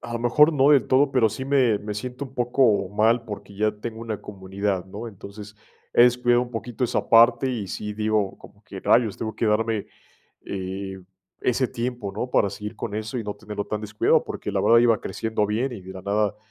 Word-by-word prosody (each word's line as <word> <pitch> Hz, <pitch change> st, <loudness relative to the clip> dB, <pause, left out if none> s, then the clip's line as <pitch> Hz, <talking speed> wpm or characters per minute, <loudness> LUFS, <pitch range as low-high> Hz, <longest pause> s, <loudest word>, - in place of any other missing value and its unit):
a 120 Hz, -, -8 dB
lo 115 Hz, -, -3 dB
mejor 150 Hz, +7 st, +5 dB
no 140 Hz, -1 st, +4 dB
del 145 Hz, -3 st, +5 dB
todo, 135 Hz, +2 st, +3 dB
pero 125 Hz, -4 st, +3 dB
sí 120 Hz, +5 st, -6 dB
me 130 Hz, -5 st, +3 dB
me 105 Hz, 0 st, -5 dB
siento 125 Hz, +6 st, -5 dB
un 135 Hz, -, -12 dB
poco 120 Hz, -6 st, +2 dB
mal, 115 Hz, +3 st, +2 dB
porque 100 Hz, -1 st, -9 dB
ya 110 Hz, +1 st, +1 dB
tengo 110 Hz, +2 st, -7 dB
una 110 Hz, -3 st, -5 dB
comunidad, 95 Hz, -1 st, -3 dB
¿no?, 105 Hz, +5 st, -7 dB
entonces, 105 Hz, 0 st, -11 dB, 0.4 s
he -, -, +6 dB
descuidado 120 Hz, 0 st, +4 dB
un 125 Hz, -, -8 dB
poquito 120 Hz, +2 st, -3 dB
esa -, -, -2 dB
parte 120 Hz, +3 st, +5 dB
y 110 Hz, -6 st, -3 dB
sí, 105 Hz, +3 st, -5 dB
digo, 105 Hz, -2 st, -1 dB
como 105 Hz, -, -17 dB
que: 95 Hz, 0 st, -9 dB
"Rayos, 110 Hz, +1 st, +2 dB
tengo 110 Hz, -1 st, -4 dB
que 115 Hz, -, -1 dB
darme, 110 Hz, 0 st, 0 dB, 0.6 s
eh, 95 Hz, 0 st, -5 dB, 0.4 s
ese 125 Hz, +1 st, +1 dB
tiempo", 120 Hz, -5 st, -4 dB
¿no?, 125 Hz, +5 st, -4 dB
para 100 Hz, -, +2 dB
seguir 105 Hz, +2 st, -7 dB
con 105 Hz, -, -5 dB
eso 110 Hz, +3 st, -4 dB
y 110 Hz, -, -4 dB
no 105 Hz, -, -4 dB
tenerlo 105 Hz, -1 st, -6 dB
tan 105 Hz, 0 st, -3 dB
descuidado, 105 Hz, 0 st, +2 dB
porque -, -, -6 dB
la -, -, +1 dB
verdad 115 Hz, 0 st, +5 dB
iba 115 Hz, -2 st, +3 dB
creciendo 110 Hz, -1 st, -2 dB
bien 115 Hz, +6 st, -1 dB
y 105 Hz, -, -7 dB
de 95 Hz, +1 st, -10 dB
la 95 Hz, -, -8 dB
nada, 105 Hz, +1 st, 0 dB
110 Hz, 215 wpm, -24 LUFS, 105-120 Hz, 0.6 s, he